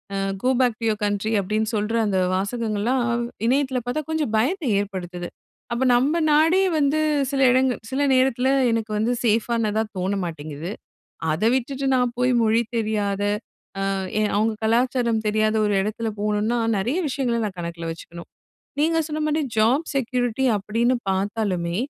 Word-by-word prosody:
A - - -1 0.3
"go 255 - +3
back 245 -3 +2
two 230 - -3
your 215 0 -2
country" 205 +2 -1
அப்படின்னு 215 +3 -1
சொல்ற 210 +2 -1
அந்த 190 -2 0 0.2
வாசகங்கள்லாம் 225 +4 -1 0.2
வ் 235 - -3 0.2
இணையத்துல 265 0 +1
பாத்தா, 280 +5 -1
கொஞ்சம் 300 -8 -1
பயத்தை 295 - 0
ஏற்படுத்துது. 180 -3 -6 0.4
அப்ப, 245 +3 0
நம்ம 285 +7 +2
நாடே 325 +5 +4 0.2
வந்து 295 +1 +2 0.3
சில 275 - -1
இடங்கள் 260 0 +2
சில 270 - -1
நேரத்துல 260 0 +2 0.2
எனக்கு 225 -1 -2
வந்து 225 +3 +1
சேஃபானதா 220 -1 +1 0.2
தோண 190 +2 -1
மாட்டிங்குது. 155 0 -6 0.6
அதை 215 +8 +1
விட்டுட்டு 270 +2 -2
நான் 250 -1 +1
போய் 250 +1 +2
மொழி 225 +1 +3 0.2
தெரியாத, 205 -2 -1 0.7
அ - - 0 0.3
எ 215 - +2
அவங்க 220 +1 +2
கலாச்சாரம் 235 -1 +1
தெரியாத 215 +1 +1
ஒரு 205 - +1
எடத்தில 220 +2 -2
போணும்னா, 210 +3 0 0.2
நெறைய 245 - -1
விஷயங்களை 250 -4 -1
நான் 195 -3 -5
கணக்கில 170 -1 -5
வச்சுக்கணும். 170 +1 -10 0.5
நீங்க 325 +1 +2
சொன்ன 305 0 -3
மாரி, 305 +1 +1 0.2
ஜாப் 250 +9 +3
செக்யூரிட்டி 250 -1 0
அப்படின்னு 230 +5 0
பாத்தாலுமே, 190 -3 -1
225 Hz, 150 wpm, -23 LUFS, 205-255 Hz, 0.7 s, நாடே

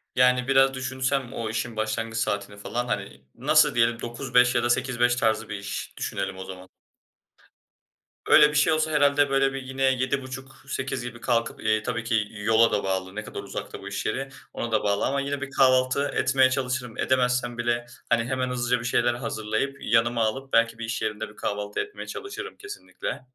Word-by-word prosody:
Yani 125 0 +4
biraz 135 0 +5
düşünsem 130 0 -2
o 115 -3 -3
işin 115 +1 -3
başlangıç 115 +1 -2
saatini 100 -2 -2
falan, 120 +4 -3
hani, 100 - -4
nasıl - - +4
diyelim 115 0 +2
9-5 125 0 +2
ya - - +2
da 120 - +1
8-5 120 -1 +2
tarzı 110 -2 0
bir 105 - -3
iş 100 0 -6
düşünelim 95 -1 -3
o 95 - -7
zaman. 95 0 -10 1.6
Öyle 150 - +8
bir 150 - -5
şey 150 +1 +4
olsa 155 0 +1
herhâlde 145 -1 +4
böyle 135 0 +2
bir 135 - -4
yine 130 +1 -4
7.30-8.00 130 0 -2
gibi 120 0 -8
kalkıp, 115 -2 0
eee, 110 0 +2
tabii 115 0 -2
ki 115 -3 +1
yola 110 +2 +3
da 105 - 0
bağlı, 95 0 -2
ne 110 - -4
kadar - - -7
uzakta - - -7
bu 100 - -8
iş 100 - -4
yeri 135 +1 -2 0.2
ona 120 - -4
da 110 - +2
bağlı 100 0 +1
ama 140 +1 0
yine 140 0 -3
bir 135 0 -5
kahvaltı 130 +1 +3
etmeye 130 0 +4
çalışırım. 130 -3 -2
Edemezsem 125 -2 +1
bile 120 0 0 0.2
hani 115 -1 +3
hemen 130 +1 -1
hızlıca 125 0 0
bir 120 - -7
şeyler 120 -1 +2
hazırlayıp, 115 +3 -2
yanıma 115 0 +2
alıp 135 +5 -3
belki 115 0 +3
bir 115 - -3
iş 115 -2 -3
yerinde 110 0 -3
bir 105 - -16
kahvaltı 105 0 -3
etmeye 415 - -5
çalışırım 410 -3 -7
kesinlikle. 410 - -6
120 Hz, 185 wpm, -26 LUFS, 110-130 Hz, 1.6 s, Öyle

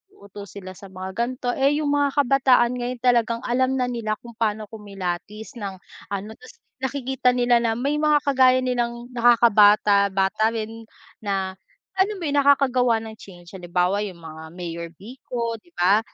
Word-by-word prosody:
uuto 200 - -11
sila 185 -1 -9
sa 195 - -12
mga 185 0 -7
ganto, 245 +1 -2
eh 280 +2 +2
yung 295 -2 0
mga 285 -1 +1
kabataan 255 -2 +3
ngayon 245 0 -4
talagang 235 -2 +2
alam 260 +2 +1
na 250 -1 0
nila 230 -3 -2
kung 235 -1 -13
pano 215 -1 -1
kumilatis 205 +2 -6
ng 200 -2 -5 0.4
ano, 200 +1 -4
tas 255 - -15 0.3
nakikita 265 -1 0
nila 245 -1 +3
na 230 -1 0
may 280 +5 -1
mga 300 -1 +3
kagaya 260 -2 +4
nilang 240 -1 -2
nakakabata-bata 210 -4 +4
rin 225 0 -6 0.3
na 195 -2 -2 0.5
alam 410 +2 +2
mo 375 - -8
yung 290 -2 +1
nakakagawa 260 -4 +3
ng 220 -1 -9
change, 175 -3 -14
halimbawa 180 +1 -1
yung 185 -4 -7
mga 160 0 -9
Mayor 170 -1 -6
Vico,'di 230 - -6
ba? 195 +4 +4
230 Hz, 155 wpm, -23 LUFS, 200-255 Hz, 0.5 s, kagaya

